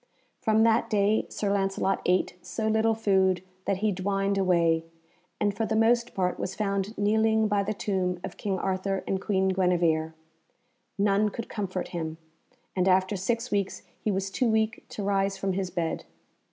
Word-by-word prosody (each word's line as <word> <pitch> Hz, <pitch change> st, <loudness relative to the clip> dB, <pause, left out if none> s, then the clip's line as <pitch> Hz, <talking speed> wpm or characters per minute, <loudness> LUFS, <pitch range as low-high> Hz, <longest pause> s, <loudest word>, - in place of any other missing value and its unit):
From 220 Hz, 0 st, +3 dB
that 230 Hz, 0 st, +3 dB
day 210 Hz, 0 st, +2 dB
Sir 200 Hz, -1 st, -1 dB
Lancelot 195 Hz, 0 st, 0 dB
ate 180 Hz, +1 st, +2 dB
so 220 Hz, -1 st, -3 dB
little 220 Hz, +1 st, +2 dB
food 190 Hz, -4 st, +2 dB, 0.2 s
that 195 Hz, -, +1 dB
he 215 Hz, -, +3 dB
dwined 195 Hz, +1 st, 0 dB
away, 170 Hz, -4 st, +2 dB, 0.6 s
and 205 Hz, -1 st, +1 dB
for 225 Hz, +1 st, -1 dB
the 220 Hz, -, 0 dB
most 235 Hz, +2 st, +2 dB
part 180 Hz, -2 st, 0 dB
was 190 Hz, -, -3 dB
found 200 Hz, 0 st, -2 dB
kneeling 220 Hz, +1 st, +3 dB
by 205 Hz, -1 st, +2 dB
the 210 Hz, +2 st, -2 dB
tomb 185 Hz, -3 st, -1 dB
of -, -, -6 dB
King 195 Hz, -2 st, -2 dB
Arthur 190 Hz, +1 st, -1 dB
and 190 Hz, -1 st, -1 dB
Queen 190 Hz, -2 st, +1 dB
Guenevere. 170 Hz, -4 st, +1 dB, 0.8 s
None 205 Hz, +1 st, +3 dB
could 230 Hz, +2 st, -7 dB
comfort 185 Hz, -4 st, -3 dB
him, 160 Hz, -2 st, -4 dB, 0.6 s
and 185 Hz, 0 st, +2 dB
after 190 Hz, +2 st, +3 dB
six 230 Hz, +6 st, -2 dB
weeks 200 Hz, -2 st, -1 dB, 0.2 s
he -, -, 0 dB
was 195 Hz, -1 st, -1 dB
too 245 Hz, +4 st, +1 dB
weak 220 Hz, +1 st, +1 dB
to 205 Hz, -, -5 dB
rise 195 Hz, 0 st, +1 dB
from 195 Hz, -1 st, -1 dB
his 190 Hz, -1 st, -2 dB
bed. 170 Hz, -2 st, -2 dB
195 Hz, 170 wpm, -27 LUFS, 185-215 Hz, 0.8 s, From